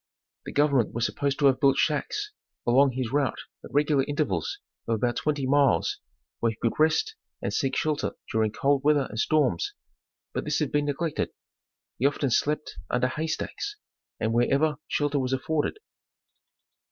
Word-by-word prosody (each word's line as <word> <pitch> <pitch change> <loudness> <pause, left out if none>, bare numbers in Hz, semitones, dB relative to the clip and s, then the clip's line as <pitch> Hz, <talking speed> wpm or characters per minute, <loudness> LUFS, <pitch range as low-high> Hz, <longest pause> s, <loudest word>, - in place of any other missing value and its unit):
The - - -5
government 140 -7 +2
was 115 0 +1
supposed 140 -1 -1
to 145 - +2
have 135 -2 +5
built 135 -1 +4
shacks 415 - 0 0.3
along 130 +2 +4
his 125 -2 -2
route 145 -2 +1 0.3
at - - -9
regular 145 -1 +3
intervals 145 - -1 0.3
of 115 - +2
about 120 +2 0
twenty 145 -3 0
miles, 140 +1 +3 0.4
where 115 - +2
he 110 - -11
could 115 - +1
rest 160 - +3 0.3
and - - -3
seek 135 -4 0
shelter 155 -1 0 0.2
during 110 -1 +1
cold 140 +4 +1
weather 145 -2 +4
and 110 - -5
storms, 155 - +1 0.6
but - - -2
this - - 0
had 150 -4 -1
been 145 0 +1
neglected. 145 +2 -1 0.7
He 135 - +4
often 140 -2 -1
slept 150 +5 0
under 125 +1 +1
hay 155 +4 -3
stacks, 410 - -3 0.4
and 110 +1 0
wherever 140 +6 +2
shelter 145 -1 0
was 130 0 -1
afforded. 150 - -1
140 Hz, 165 wpm, -27 LUFS, 130-150 Hz, 0.7 s, have